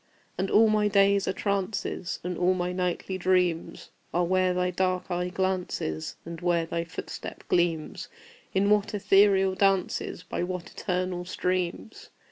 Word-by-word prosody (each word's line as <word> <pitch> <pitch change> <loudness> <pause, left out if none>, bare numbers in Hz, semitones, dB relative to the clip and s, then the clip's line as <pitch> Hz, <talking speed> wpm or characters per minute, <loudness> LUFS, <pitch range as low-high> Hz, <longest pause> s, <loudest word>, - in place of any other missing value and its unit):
And 190 +1 -1
all 220 +1 +6
my 215 -1 +3
days 200 0 +3
are - - +2
trances, 200 -2 -2
And 180 0 -3
all 180 +2 +2
my 180 0 -1
nightly 180 +1 -2
dreams 180 -2 0 0.2
Are 175 - +3
where 185 +1 +2
thy 180 0 0
dark 185 0 -1
eye 180 0 -1
glances, 180 - -2
And 165 0 -7
where 175 -2 +1
thy 170 0 -3
footstep 165 - -7
gleams 170 -3 0 0.4
In 200 +2 +2
what 210 0 +2
ethereal 195 -1 +4
dances, 190 -2 0
By 175 - -4
what 180 0 -4
eternal 180 -1 -2
streams! 180 +3 -3
185 Hz, 145 wpm, -27 LUFS, 175-195 Hz, 0.4 s, all